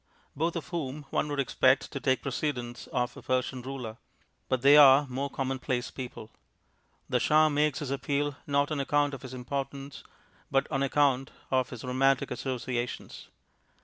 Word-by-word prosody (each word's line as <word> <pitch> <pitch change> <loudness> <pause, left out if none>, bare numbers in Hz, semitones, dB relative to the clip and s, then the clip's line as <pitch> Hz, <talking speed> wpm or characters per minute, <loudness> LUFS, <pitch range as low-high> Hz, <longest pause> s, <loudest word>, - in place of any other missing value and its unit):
both 165 +4 0
of 170 - -5
whom 150 -4 -4
one - - 0
would 145 -1 -3
expect 130 0 +2
to 140 - -4
take 130 -1 +1
precedence 125 -3 -3
of 125 -1 -2
a - - -10
Persian 130 0 -1
ruler. 125 -4 -6 0.5
But 130 -1 0
they 140 +1 +8
are 145 -1 +8
more 135 +2 -3
commonplace 130 -2 -2
people. 120 -4 -8 0.8
The - - +1
Shah 155 +1 +4
makes 150 -1 +1
his 140 -3 -4
appeal, 140 +1 -1
not 140 +1 +1
on 150 - -1
account 145 +1 +1
of 135 - -6
his 130 -1 -8
importance 135 +2 -5 0.5
but 135 0 +2
on 135 -2 0
account 135 -1 +2 0.2
of 130 -1 +2
his 125 -4 -8
romantic 135 +1 +2
associations. 125 -1 -4
135 Hz, 160 wpm, -29 LUFS, 130-145 Hz, 0.8 s, they